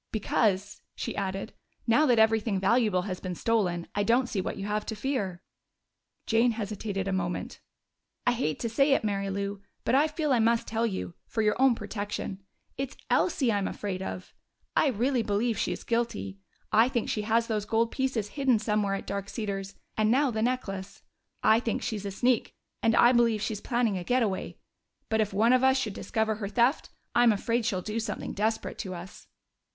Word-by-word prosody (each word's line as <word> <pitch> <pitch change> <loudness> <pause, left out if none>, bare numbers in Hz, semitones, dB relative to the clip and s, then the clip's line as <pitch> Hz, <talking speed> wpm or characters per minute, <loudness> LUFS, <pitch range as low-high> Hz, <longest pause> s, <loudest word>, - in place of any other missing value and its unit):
"Because," 205 -2 0
she - - -4
added, 195 +1 -3 0.3
"now 295 +7 +4
that 245 -2 +4
everything 220 -2 +3
valuable 200 -2 +2
has 185 -2 -4
been 180 -1 -4
stolen, 180 -6 0
I 205 - 0
don't 235 +5 +3
see 200 -5 -1
what - - -4
you 195 - -4
have 210 +1 -1
to 220 - -3
fear." 210 -7 -2 0.8
Jane 230 +1 +3
hesitated 205 -2 -3
a 195 - 0
moment. 180 -1 -3 0.7
"I 245 - +4
hate 230 - -1
to 235 - 0
say 275 +5 +3
it, - - +2
Mary 200 -2 -1
Lou, 200 0 -3 0.2
but - - +1
I 285 +4 +5
feel 305 -2 0
I 245 - +3
must 230 +1 +3
tell 225 +1 0
you 190 -4 -4
for 220 - -1
your 210 - +3
own 265 -3 +6
protection. 205 -3 -5 0.4
It's 270 -1 -4
Elsie 270 -9 +2
I'm 200 -2 0
afraid 190 -3 -4
of. 185 -1 -6 0.4
I - - +4
really 250 +1 +1
believe 220 +2 0
she - - 0
is - - -5
guilty. 100 - -2 0.3
I 225 +3 +5
think 240 -3 -1
she 210 - -1
has 225 +2 +2
those 215 -3 -2
gold 225 +2 +1
pieces 255 -6 -1
hidden 265 -1 +2
somewhere 210 -2 0
at 195 - -6
Dark 200 0 -4
Cedars 195 -3 -4 0.2
and 215 0 +2
now 270 +3 +3
the 220 -1 -2
necklace. 200 -6 -3 0.4
I 220 +1 +6
think 230 -2 -2
she's 210 -4 -3
a - - -2
sneak, 245 +4 +1 0.3
and 225 0 +3
I 240 - +7
believe 230 -3 +3
she's 215 -2 -3
planning 235 -6 0
a - - -5
getaway. 225 -3 0 0.5
But 220 0 +2
if 210 - 0
one 220 +5 +4
of 255 0 +4
us 265 0 +5
should 230 -6 -2
discover 220 +1 -1
her 210 -2 -3
theft, 240 +6 +2 0.2
I'm 240 -1 +6
afraid 230 +2 0
she'd 185 -5 -1
do 215 +1 -2
something 225 - -4
desperate 220 +2 -1
to 185 -4 -4
us." 175 +2 -10
220 Hz, 195 wpm, -28 LUFS, 200-235 Hz, 0.8 s, I